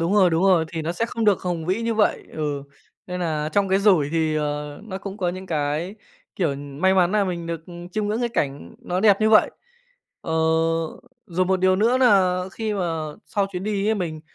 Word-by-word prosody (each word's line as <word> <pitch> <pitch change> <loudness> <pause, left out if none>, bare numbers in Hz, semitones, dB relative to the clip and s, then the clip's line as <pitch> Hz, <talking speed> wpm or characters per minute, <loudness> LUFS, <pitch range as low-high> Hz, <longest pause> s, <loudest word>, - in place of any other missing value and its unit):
Đúng 170 +5 +1
rồi, 190 -4 +5
đúng 165 +2 +1
rồi, 180 -4 +4
thì 165 -2 -3
nó 165 +2 -2
sẽ 225 +6 -1
không 230 -1 -3
được 205 -3 +3
hùng 175 -3 -3
vĩ 190 +6 0
như 230 0 0
vậy, 215 -1 +1
ừ, 145 -3 -3 0.4
nên 180 0 -4
nà 155 -3 -1
trong 200 -1 +2
cái 190 +1 +3
rủi 185 -8 +4
thì, 160 -1 +1
ờ, 150 -1 -3
nó 190 -3 -6
cũng 195 0 -7
có 180 -4 -1
những 185 +2 -5
cái, 155 +3 -2 0.4
kiểu, 160 -7 0
may 145 +7 0
mắn 185 0 +3
nà 210 -1 +3
mình 175 -3 -4
được 165 -1 -4 0.3
chiêm 215 -1 -1
ngưỡng 215 +3 -1
cái 240 - 0
cảnh 140 -10 -3
nó 180 +1 -3
đẹp 205 -1 +5
như 215 - +3
vậy. 215 - +6 0.7
Ờ, 160 - -5 0.9
rồi 185 0 0
một 190 0 +1
điều 185 0 +4
nữa 235 +5 +3
nà 190 -7 +4
khi 220 -2 -3
mà 165 -5 -2
sau 200 -1 0
chuyến 180 +1 -4
đi 205 -1 -1
ấy 220 - +3
mình 165 -6 -4
185 Hz, 220 wpm, -23 LUFS, 160-205 Hz, 0.9 s, vậy